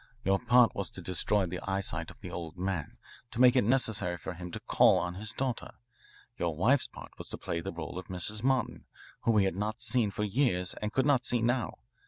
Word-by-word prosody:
Your 95 Hz, 0 st, +2 dB
part 125 Hz, +2 st, +5 dB
was 100 Hz, -2 st, -3 dB
to -, -, -8 dB
destroy 95 Hz, +3 st, +1 dB
the 90 Hz, 0 st, -4 dB
eyesight 95 Hz, 0 st, -2 dB
of -, -, -14 dB
the -, -, -7 dB
old 85 Hz, 0 st, -6 dB
man, 90 Hz, -4 st, -3 dB, 0.3 s
to 115 Hz, -, -7 dB
make 125 Hz, 0 st, +7 dB
it 125 Hz, -, +5 dB
necessary 105 Hz, -7 st, +1 dB
for 90 Hz, -, -6 dB
him 90 Hz, 0 st, -7 dB
to -, -, -6 dB
call -, -, +4 dB
on 90 Hz, -, -2 dB
his 105 Hz, +3 st, -5 dB
daughter. 130 Hz, 0 st, -3 dB, 0.7 s
Your 85 Hz, -3 st, -1 dB
wife's 120 Hz, -, +3 dB
part -, -, -11 dB
was -, -, -6 dB
to -, -, -6 dB
play 85 Hz, -, -3 dB
the -, -, -4 dB
role 85 Hz, +1 st, -6 dB
of 95 Hz, -, -10 dB
Mrs. 95 Hz, +4 st, -3 dB
Martin, 130 Hz, 0 st, 0 dB, 0.4 s
whom 115 Hz, -2 st, +4 dB
he 100 Hz, -, +5 dB
had 95 Hz, -, -1 dB
not 105 Hz, +4 st, -2 dB
seen 120 Hz, -5 st, +3 dB
for 105 Hz, -, -3 dB
years 100 Hz, -5 st, +1 dB
and 105 Hz, 0 st, -2 dB
could 130 Hz, +2 st, +1 dB
not 140 Hz, -4 st, +3 dB
see 120 Hz, -2 st, 0 dB
now. 120 Hz, 0 st, 0 dB
100 Hz, 225 wpm, -30 LUFS, 90-120 Hz, 0.7 s, make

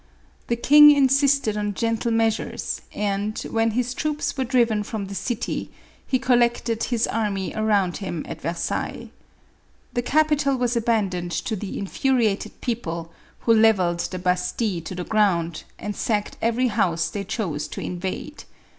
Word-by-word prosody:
The 235 Hz, -, +1 dB
king 295 Hz, +5 st, +8 dB
insisted 275 Hz, -4 st, +4 dB
on 205 Hz, -1 st, -2 dB
gentle 230 Hz, +1 st, 0 dB
measures, 225 Hz, -1 st, -1 dB
and, 205 Hz, +1 st, -2 dB
when 225 Hz, 0 st, +2 dB
his 245 Hz, +2 st, -1 dB
troops 300 Hz, +2 st, -2 dB
were 265 Hz, -, 0 dB
driven 235 Hz, -4 st, +2 dB
from 210 Hz, -1 st, -4 dB
the 195 Hz, -, -7 dB
city, 230 Hz, +3 st, -3 dB, 0.4 s
he 260 Hz, -, +2 dB
collected 240 Hz, -3 st, +1 dB
his 240 Hz, -2 st, +1 dB
army 205 Hz, -4 st, -2 dB
around 205 Hz, -5 st, +1 dB
him 175 Hz, -6 st, -4 dB
at -, -, -7 dB
Versailles. 170 Hz, +3 st, -3 dB, 0.8 s
The 245 Hz, -, 0 dB
capital 295 Hz, 0 st, +2 dB
was 245 Hz, -1 st, 0 dB
abandoned 200 Hz, -7 st, 0 dB
to 220 Hz, -, -1 dB
the 205 Hz, 0 st, -5 dB
infuriated 220 Hz, 0 st, 0 dB
people, 170 Hz, -9 st, -3 dB, 0.3 s
who 230 Hz, -, +4 dB
levelled 200 Hz, -6 st, +4 dB
the 185 Hz, -, -3 dB
Bastile 180 Hz, +1 st, -1 dB
to 185 Hz, -, -5 dB
the 180 Hz, -, -4 dB
ground, 170 Hz, -6 st, +1 dB
and 210 Hz, 0 st, -5 dB
sacked 210 Hz, -2 st, -1 dB
every 240 Hz, +2 st, +1 dB
house 175 Hz, -7 st, +1 dB
they 205 Hz, -3 st, -3 dB
chose 175 Hz, -8 st, -3 dB
to -, -, -7 dB
in 180 Hz, -, -4 dB
vade. 190 Hz, +10 st, -5 dB
220 Hz, 150 wpm, -23 LUFS, 190-240 Hz, 0.8 s, king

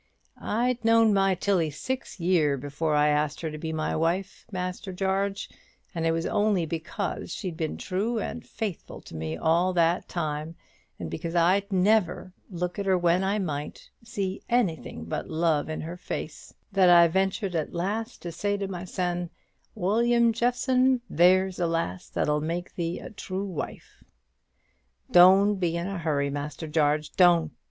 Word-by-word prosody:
I'd 240 Hz, +2 st, 0 dB
known 225 Hz, -1 st, +5 dB
my 195 Hz, -1 st, +3 dB
Tilly 180 Hz, -3 st, +1 dB
six 255 Hz, -, -5 dB
year 165 Hz, -5 st, +2 dB
before 145 Hz, +3 st, -2 dB
I 150 Hz, 0 st, +4 dB
asked 150 Hz, 0 st, 0 dB
her 160 Hz, -2 st, -3 dB
to 155 Hz, -, -6 dB
be 160 Hz, +1 st, -4 dB
my 155 Hz, -1 st, -2 dB
wife, 175 Hz, +5 st, -1 dB
Master 185 Hz, 0 st, -4 dB
Jarge; 195 Hz, +2 st, -1 dB, 0.5 s
and 165 Hz, -2 st, -1 dB
it -, -, +3 dB
was 165 Hz, 0 st, -1 dB
only 205 Hz, -5 st, +1 dB
because 165 Hz, +4 st, -4 dB
she'd 180 Hz, -3 st, -4 dB
been 160 Hz, -2 st, -3 dB
true 210 Hz, +6 st, -2 dB
and 230 Hz, +2 st, -4 dB
faithful 205 Hz, -6 st, -6 dB
to -, -, -12 dB
me 80 Hz, 0 st, -4 dB
all 170 Hz, -, +2 dB
that 170 Hz, 0 st, +1 dB
time, 155 Hz, -1 st, -3 dB, 0.4 s
and -, -, -6 dB
because 165 Hz, +1 st, -4 dB
I'd 190 Hz, +4 st, +3 dB
never, 190 Hz, -1 st, +2 dB, 0.2 s
look 180 Hz, 0 st, -4 dB
at 200 Hz, -, -3 dB
her 190 Hz, -1 st, +4 dB
when 175 Hz, +1 st, +2 dB
I 195 Hz, +2 st, +1 dB
might, 150 Hz, -7 st, -5 dB
seen 195 Hz, -3 st, -3 dB
anything 175 Hz, -, -1 dB
but 85 Hz, -, -4 dB
love 160 Hz, -2 st, +1 dB
in 155 Hz, -, -3 dB
her 170 Hz, +3 st, -6 dB
face, -, -, -6 dB, 0.2 s
that 190 Hz, -2 st, +4 dB
I 170 Hz, -1 st, +8 dB
ventured 190 Hz, +2 st, 0 dB
at 160 Hz, -3 st, -2 dB
last 215 Hz, +7 st, -3 dB
to 170 Hz, -, -4 dB
say 205 Hz, +5 st, -1 dB
to 200 Hz, -1 st, -3 dB
mysen, 180 Hz, -1 st, -3 dB, 0.5 s
'William 235 Hz, +4 st, +3 dB
Jeffson, 250 Hz, +2 st, +2 dB
there's 185 Hz, +3 st, +4 dB
a 175 Hz, -, +1 dB
lass 165 Hz, -, -2 dB
that'll 150 Hz, 0 st, 0 dB
make 170 Hz, +3 st, -4 dB
thee 170 Hz, 0 st, -3 dB
a -, -, -9 dB
true 195 Hz, -1 st, -4 dB
wife.' 185 Hz, -5 st, -7 dB, 1.1 s
Doan't 190 Hz, +3 st, +6 dB
be 170 Hz, -2 st, 0 dB
in 170 Hz, -, -3 dB
a 195 Hz, -1 st, -4 dB
hurry, 145 Hz, -3 st, 0 dB
Master 145 Hz, +2 st, -5 dB
Jarge; 150 Hz, -1 st, +1 dB
doan't! 170 Hz, -4 st, +4 dB
180 Hz, 165 wpm, -27 LUFS, 160-195 Hz, 1.1 s, I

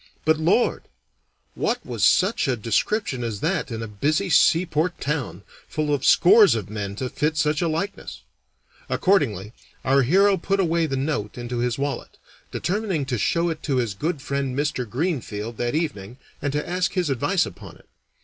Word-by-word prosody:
But, 160 Hz, 0 st, +3 dB
Lord! 180 Hz, +9 st, +2 dB, 0.7 s
what 240 Hz, 0 st, -2 dB
was 120 Hz, -4 st, -3 dB
such 190 Hz, -1 st, +3 dB
a 130 Hz, -, +1 dB
description 125 Hz, -, -1 dB
as 110 Hz, -4 st, -3 dB
that 165 Hz, -3 st, -1 dB
in 115 Hz, -1 st, -4 dB
a -, -, -5 dB
busy 155 Hz, -, -1 dB
seaport 165 Hz, +2 st, +3 dB
town, 130 Hz, -, -3 dB, 0.2 s
full 155 Hz, -1 st, -1 dB
of 140 Hz, -, -1 dB
scores 200 Hz, -, +6 dB
of 105 Hz, -3 st, -5 dB
men 100 Hz, -2 st, -4 dB
to 130 Hz, +5 st, -3 dB
fit 150 Hz, +5 st, -1 dB
such 150 Hz, -1 st, +1 dB
a 170 Hz, -, +1 dB
likeness? 170 Hz, +6 st, -4 dB, 0.7 s
Accordingly, 110 Hz, -, +1 dB, 0.3 s
our 135 Hz, +1 st, +4 dB
hero 195 Hz, +9 st, +4 dB
put 195 Hz, +3 st, -1 dB
away 170 Hz, -3 st, +1 dB
the 135 Hz, -2 st, -2 dB
note 130 Hz, -7 st, -2 dB
into 120 Hz, 0 st, -4 dB
his 120 Hz, -1 st, 0 dB
wallet, 140 Hz, -2 st, -4 dB, 0.3 s
determining 190 Hz, -6 st, -2 dB
to 125 Hz, -4 st, -2 dB
show 170 Hz, -, +1 dB
it 160 Hz, -, -6 dB
to 140 Hz, -, -1 dB
his 120 Hz, -5 st, 0 dB
good 150 Hz, -, -3 dB
friend 140 Hz, -2 st, -2 dB
Mr. 145 Hz, -5 st, -1 dB
Greenfield 120 Hz, -, -3 dB
that 120 Hz, +3 st, -1 dB
evening, 125 Hz, -, -3 dB, 0.2 s
and 145 Hz, -, -1 dB
to 150 Hz, 0 st, -2 dB
ask 180 Hz, 0 st, -1 dB
his 180 Hz, -6 st, 0 dB
advice 130 Hz, -, +1 dB
upon -, -, -10 dB
it. -, -, -22 dB
145 Hz, 175 wpm, -23 LUFS, 120-170 Hz, 0.7 s, scores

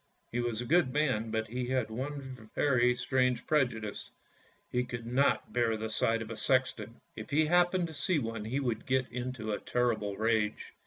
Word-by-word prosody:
He 120 Hz, -, -1 dB
was 120 Hz, -2 st, -1 dB
a -, -, -4 dB
good 155 Hz, -1 st, +3 dB
man, 130 Hz, -6 st, +1 dB
but 110 Hz, 0 st, -1 dB
he 125 Hz, +2 st, -3 dB
had 125 Hz, -4 st, 0 dB
one 130 Hz, -2 st, -6 dB
very 125 Hz, -3 st, +3 dB
strange 125 Hz, -1 st, +1 dB
prejudice 120 Hz, -8 st, 0 dB, 0.3 s
— -, -, -34 dB
he 125 Hz, 0 st, +1 dB
could 125 Hz, -2 st, -6 dB
not 130 Hz, +4 st, +1 dB
bear 115 Hz, -2 st, +2 dB
the 110 Hz, 0 st, -4 dB
sight 115 Hz, +1 st, +1 dB
of 110 Hz, -, -9 dB
a 115 Hz, -, -5 dB
sexton. 125 Hz, -4 st, 0 dB, 0.2 s
If 110 Hz, -, -7 dB
he 155 Hz, +2 st, +3 dB
happened 175 Hz, +2 st, +3 dB
to -, -, -9 dB
see 155 Hz, +4 st, +1 dB
one 115 Hz, -5 st, -3 dB
he 130 Hz, +6 st, -1 dB
would 120 Hz, -5 st, -2 dB
get 130 Hz, -1 st, +2 dB
into 125 Hz, -3 st, -4 dB
a 105 Hz, -, -1 dB
terrible 110 Hz, -5 st, 0 dB
rage. 110 Hz, -1 st, 0 dB
125 Hz, 195 wpm, -31 LUFS, 110-130 Hz, 0.3 s, good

